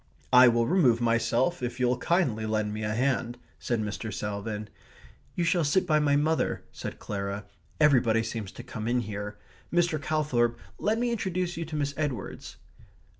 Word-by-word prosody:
"I 125 0 +9
will 120 -1 +3
remove 130 -8 +4
myself 120 +7 +1
if 125 +1 -4
you'll 125 0 +2
kindly 125 - +1
lend 110 -1 0
me 105 - -4
a 105 0 -1
hand," 125 -1 0 0.2
said 120 -2 -1
Mr. 105 +1 -4
Salvin. 105 +1 -4 0.7
"You 175 - 0
shall 170 0 +2
sit 155 +6 +2
by 155 -1 +3
my 145 -1 +3
mother," 155 +3 +1
said - - -6
Clara. 100 0 -4 0.3
"Everybody 120 -7 +4
seems 110 -3 -5
to 120 - -9
come 110 -3 -6
in 125 +1 +2
here.... 105 -1 -5 0.3
Mr. 170 -3 +2
Calthorp, 130 -6 +1 0.2
let 215 +2 +1
me 240 +1 0
introduce 185 -5 -2
you 165 - -3
to 155 - -6
Miss 145 -1 -1
Edwards." 140 -9 -4
125 Hz, 170 wpm, -28 LUFS, 110-155 Hz, 0.7 s, I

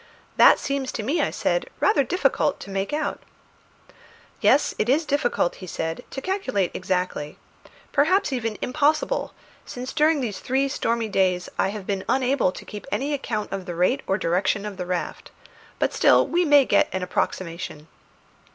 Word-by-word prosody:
"That - - +7
seems 275 -2 -2
to 220 - -3
me," 285 +10 0
I - - +1
said, - - -1
"rather 350 -9 +3
difficult 360 +6 +1
to 200 - -8
make 195 0 -2
out." 300 +1 -2 1.2
"Yes, - - +3
it 215 - +1
is 305 +5 +3
difficult," 280 -11 0
he 185 - -9
said, 165 -1 -4
"to 270 - -6
calculate 260 - -1
exactly; 180 -5 -2 0.5
perhaps 345 +3 +2
even 225 -4 -2
impossible, 305 - 0 0.3
since 250 +1 -7
during 310 0 +3
these 215 -7 -3
three 270 +2 0
stormy 230 -3 -1
days 185 -3 +1
I - - +3
have 200 -1 -5
been 195 -1 -2
unable 260 -6 +2
to - - -10
keep 210 +3 -9
any 285 +2 -1
account 225 -6 -3
of 195 -1 -5
the 175 - -4
rate 185 +11 +2
or 190 - +1
direction 190 +3 0
of 205 -2 -6
the 180 -1 -5
raft; 180 -1 -4 0.5
but - - 0
still - - +5
we 350 +1 +1
may 290 -3 +6
get - - +3
an 185 -1 -2
approximation." 170 -4 -3
225 Hz, 170 wpm, -24 LUFS, 185-285 Hz, 1.2 s, That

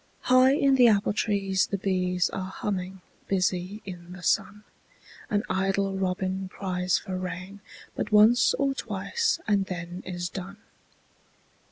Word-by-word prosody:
High 255 +1 +5
in 275 -2 +3
the 245 -2 +7
apple 205 -2 +3
trees 195 -3 0
the 200 - -2
bees 180 -2 0
Are 190 -1 -4
humming, 190 -1 -4 0.3
busy 185 +1 -1
in 180 -2 -9
the 180 -1 -11
sun, 205 +5 0 0.7
An 205 0 +1
idle 195 +1 0
robin 190 0 -2
cries 180 -2 -1
for 190 -3 -5
rain 185 +2 -6 0.4
But - - -3
once 215 +3 +5
or 275 -1 0
twice 270 - -1
and 200 -2 +2
then 175 0 -6
is 175 -1 -4
done. 190 +2 -7
190 Hz, 140 wpm, -27 LUFS, 185-210 Hz, 0.7 s, the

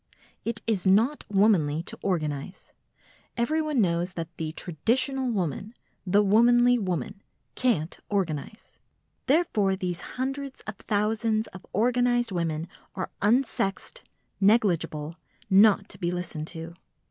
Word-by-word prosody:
It 230 -1 -4
is 205 -4 0
not 225 +10 +3
womanly 180 -7 +3
to - - -7
organise. 155 -3 -3 0.6
Everyone 305 +3 0
knows 175 -1 0
that 165 0 -6
the 160 -1 -3
traditional 250 - 0
woman, 195 - -3 0.3
the 205 +3 +4
womanly 240 +4 +5
woman, 185 - -3 0.3
can't 200 -11 0
organise. 190 - -3 0.5
Therefore 240 - +2
these 180 -2 -3 0.2
hundreds 270 +1 -4
of - - -8
thousands 215 +1 0
of 185 - -13
organised 240 +1 +2
women 165 -2 -2 0.3
are 185 - -4
unsexed, 225 - 0 0.4
negligible, 175 -7 +1 0.3
not 200 +1 +6
to - - -12
be 175 -3 -1
listened 175 -3 -4
to. 165 0 -7
200 Hz, 115 wpm, -26 LUFS, 175-235 Hz, 0.6 s, not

